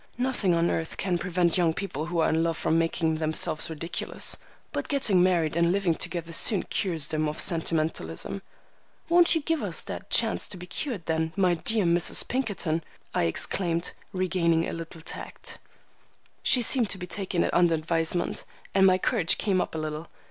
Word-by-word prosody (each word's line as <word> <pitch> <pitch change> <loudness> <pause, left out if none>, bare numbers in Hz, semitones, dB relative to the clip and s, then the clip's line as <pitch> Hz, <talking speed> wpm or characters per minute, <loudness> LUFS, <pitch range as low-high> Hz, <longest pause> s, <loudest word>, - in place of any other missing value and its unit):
Nothing 245 -8 +1
on 170 +1 +2
earth 160 0 -3
can 180 -2 0
prevent 180 -1 +1
young 165 -2 +2
people 160 -5 -4
who 175 0 -3
are - - +3
in 160 +1 +2
love 165 -1 0
from 160 - +1
making 165 0 +1
themselves 155 0 0
ridiculous. 165 +2 -2 0.4
But - - -3
getting 220 -10 +3
married 170 -4 +2
and 170 0 +3
living 190 -3 +2
together 170 0 -4
soon 200 +4 +2
cures 165 -7 0
them 155 -1 0
of 150 - -6
sentimentalism." 160 - -1 0.7
"Won't 345 0 +6
you 325 - +1
give 325 +1 0
us - - -2
that - - -7
chance - - +2
to 190 - -5
be 180 - -8
cured 195 - -4
then, 160 0 -1
my 185 -3 +3
dear 210 +4 +1
Mrs. 170 0 +2
Pinkerton?" 195 -11 -1 0.3
I - - +2
exclaimed, 170 - -1 0.2
regaining 170 -3 +1
a - - -4
little 165 0 -7
tact. - - -6 0.8
She 250 - +4
seemed 235 -2 +2
to - - 0
be 180 - -5
taking 185 -2 -1
it - - -1
under 175 -2 +4
advisement, 165 +2 -1 0.3
and 190 0 +6
my 185 0 +5
courage 190 -3 +1
came 190 -4 +1
up - - -4
a - - -2
little. 155 +1 -4
170 Hz, 180 wpm, -27 LUFS, 160-190 Hz, 0.8 s, Won't